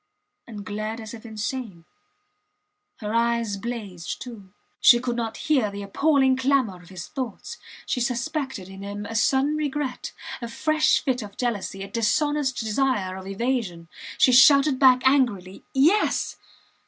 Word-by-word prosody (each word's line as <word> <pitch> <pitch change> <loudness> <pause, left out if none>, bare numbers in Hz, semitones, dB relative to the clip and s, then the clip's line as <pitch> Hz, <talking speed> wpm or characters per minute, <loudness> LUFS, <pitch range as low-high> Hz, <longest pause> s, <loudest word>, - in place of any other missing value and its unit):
and 210 -4 -8
glared 215 +2 -4
as 220 -1 -8
if 230 0 -10
insane. 215 -4 -5 1.2
Her 210 0 -3
eyes 235 -2 +1
blazed, 200 -5 -6
too. 215 -7 -10 0.3
She 240 - +7
could 240 -1 -2
not 230 -2 -3
hear 265 -9 +2
the 200 0 -7
appalling 265 +5 +2
clamour 260 -9 +1
of 175 - -17
his 185 -2 -7
thoughts. 255 -6 -6 0.3
She 250 - -1
suspected 260 - -2
in 195 0 -11
him 205 +1 -6
a 225 - -6
sudden 265 +6 +2
regret, 290 -3 -3 0.3
a 235 - -4
fresh 310 +6 +2
fit 260 -3 0
of 205 -1 -10
jealousy, 205 -5 -3
a - - -7
dishonest 280 +5 0
desire 220 -4 0
of 190 0 -9
evasion. 195 -6 -2 0.3
She 255 - +5
shouted 275 +2 +6
back 255 -2 +6
angrily 235 -9 +1
Yes! 320 +11 +2
235 Hz, 145 wpm, -24 LUFS, 205-265 Hz, 1.2 s, She